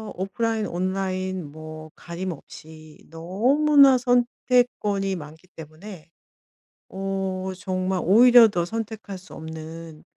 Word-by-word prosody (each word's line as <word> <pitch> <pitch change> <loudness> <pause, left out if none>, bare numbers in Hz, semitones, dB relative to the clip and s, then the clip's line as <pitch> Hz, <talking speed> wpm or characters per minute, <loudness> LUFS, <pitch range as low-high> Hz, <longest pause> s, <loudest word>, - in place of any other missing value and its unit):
오프라인, 215 +3 -2
온라인 185 -2 -3
뭐 155 0 -10
가림없이 160 -3 -9
너무나 260 - +4
선택권이 245 -5 +1
많기 160 +2 -11
때문에 160 +2 -11 0.8
어 190 -1 -3
정말 185 -1 -2
오히려 235 +4 +7
더 175 -4 -1
선택할 220 -1 -6
수 185 - -15
없는 160 0 -9
185 Hz, 220 characters per minute, -24 LUFS, 165-220 Hz, 0.8 s, 오히려